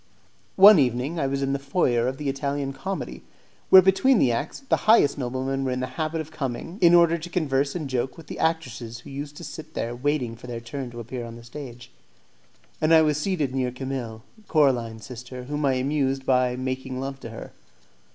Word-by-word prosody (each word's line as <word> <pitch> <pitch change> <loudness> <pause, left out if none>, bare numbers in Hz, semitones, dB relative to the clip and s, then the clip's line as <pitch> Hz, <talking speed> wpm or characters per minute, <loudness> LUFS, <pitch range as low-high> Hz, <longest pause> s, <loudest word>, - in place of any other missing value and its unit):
One 195 -1 +9
evening 130 +5 0
I 140 - +1
was 140 0 -1
in 135 0 0
the 140 - -1
foyer 135 -4 +1
of 130 +1 -3
the 150 - -4
Italian 140 0 -2
Comedy, 190 +9 -5 0.5
where 190 -1 +9
between 195 +8 +4
the 130 - +3
acts 115 - -3
the - - +4
highest 215 -10 +6
noblemen 130 +1 -2
were 130 - -1
in 125 0 -1
the 130 - -1 0.2
habit 155 +1 -1
of 155 0 -10
coming, 145 - -5
in 175 -1 +7
order 170 -1 +5
to 170 +2 -8
converse 140 -5 0
and 160 -5 -3
joke 130 +2 -2
with 165 - -11
the - - -8
actresses 120 -8 -2
who 140 - -12
used 145 +1 -7
to - - -9
sit 155 +1 -9
there 120 +1 -3
waiting 130 -3 -1
for 120 - -12
their 120 -1 -5
turn 125 +2 -6
to 120 0 -9
appear 120 +1 -6
on 115 0 -8
the 120 - -12
stage, 120 -1 -10 0.9
and 155 +1 +5
I 160 - +7
was 150 -1 +1
seated 150 -6 -1
near 130 -2 -1
Camille, 125 -4 -5 0.2
Coraline's 120 -8 +1
sister, 125 0 -8
whom 145 +3 -2
I 135 - +3
amused 135 0 0
by 125 -1 +2
making 130 0 -4
love 135 0 -5
to 115 - -8
her. 115 - -9
135 Hz, 210 wpm, -25 LUFS, 125-150 Hz, 0.9 s, One